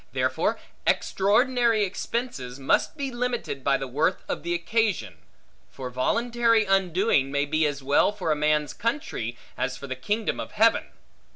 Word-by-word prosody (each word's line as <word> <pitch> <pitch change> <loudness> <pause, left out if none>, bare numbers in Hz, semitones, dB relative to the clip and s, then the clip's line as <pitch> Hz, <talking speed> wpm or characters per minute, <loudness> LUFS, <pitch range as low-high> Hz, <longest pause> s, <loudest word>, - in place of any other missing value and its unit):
Therefore - - 0 0.3
extraordinary 230 +2 +3
expense 235 - -3 0.2
must 140 - +1
be 275 -2 -3
limited 240 - -3
by 140 0 +3
the 135 - -5
worth 150 +8 0
of - - -3
the 170 0 -1
occasion; 195 - -1 0.5
for 130 -2 -7
voluntary 230 - +2
undoing, 190 -6 +2
may 140 0 +1
be 155 +1 +1
as 140 -2 -4
well 140 +8 +3
for 190 -6 -2
a - - +3
man's 150 0 +1
country, 230 - -3 0.2
as 125 -1 -1
for 140 - -8
the 130 -1 -4
kingdom 210 - -2
of - - -6
heaven. 225 +2 +4
185 Hz, 155 wpm, -26 LUFS, 140-230 Hz, 0.5 s, heaven